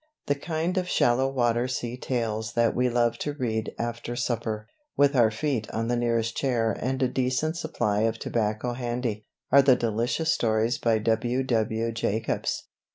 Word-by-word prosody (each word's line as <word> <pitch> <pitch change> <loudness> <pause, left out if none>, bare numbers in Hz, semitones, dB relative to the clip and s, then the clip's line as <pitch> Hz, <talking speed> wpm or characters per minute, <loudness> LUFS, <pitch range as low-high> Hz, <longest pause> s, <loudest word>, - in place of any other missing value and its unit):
The 145 - +2
kind 165 +5 -1
of 180 -1 -4
shallow 130 -2 +3
water 120 -2 +1
sea 125 -1 -3
tales 115 -3 -2
that 115 0 +2
we 125 0 +2
love 120 -1 +1
to 145 - -2
read 110 -6 -2
after 120 0 -4
supper, 110 -3 -2 0.3
with 140 0 +4
our 120 -3 +5
feet 115 0 -2
on 115 +1 -2
the 120 - +2
nearest 115 -1 0
chair 120 -5 +1
and 130 +1 -1
a - - +4
decent 130 +6 0
supply 120 -11 -1
of 115 +1 +1
tobacco 110 +2 -1
handy, 120 -3 -3 0.2
are 140 - +8
the 135 -2 +5
delicious 120 +8 0
stories 110 +1 +1
by 115 -2 +2
W.W. 115 0 0
Jacobs. 110 -1 -1
120 Hz, 160 wpm, -26 LUFS, 115-130 Hz, 0.3 s, are